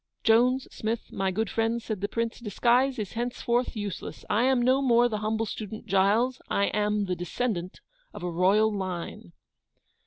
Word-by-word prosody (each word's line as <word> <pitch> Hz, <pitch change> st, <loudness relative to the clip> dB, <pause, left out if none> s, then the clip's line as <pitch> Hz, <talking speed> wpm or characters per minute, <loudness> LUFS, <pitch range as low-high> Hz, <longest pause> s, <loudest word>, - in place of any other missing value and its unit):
'Jones, 250 Hz, +3 st, +3 dB
Smith, 220 Hz, +1 st, -4 dB
my 195 Hz, 0 st, -1 dB
good 215 Hz, +4 st, -1 dB
friends,' 225 Hz, +2 st, -1 dB
said 215 Hz, -4 st, -4 dB
the 205 Hz, -, 0 dB
PRINCE, 230 Hz, +2 st, -3 dB
'disguise 245 Hz, +4 st, +2 dB
is 210 Hz, -4 st, -4 dB
henceforth 240 Hz, +1 st, -1 dB
useless; 205 Hz, -4 st, -6 dB
I 225 Hz, +4 st, +3 dB
am 260 Hz, -1 st, +3 dB
no 255 Hz, +3 st, +3 dB
more 240 Hz, -2 st, +4 dB
the 215 Hz, -3 st, -3 dB
humble 220 Hz, +1 st, -1 dB
student 215 Hz, 0 st, -6 dB
Giles, 210 Hz, +7 st, +2 dB
I 200 Hz, -, +1 dB
am 210 Hz, 0 st, +1 dB
the 185 Hz, -1 st, -2 dB
descendant 180 Hz, +1 st, -3 dB, 0.3 s
of -, -, -9 dB
a 180 Hz, -, -2 dB
royal 205 Hz, +5 st, +3 dB
line. 180 Hz, -, -5 dB
220 Hz, 165 wpm, -27 LUFS, 200-240 Hz, 0.3 s, more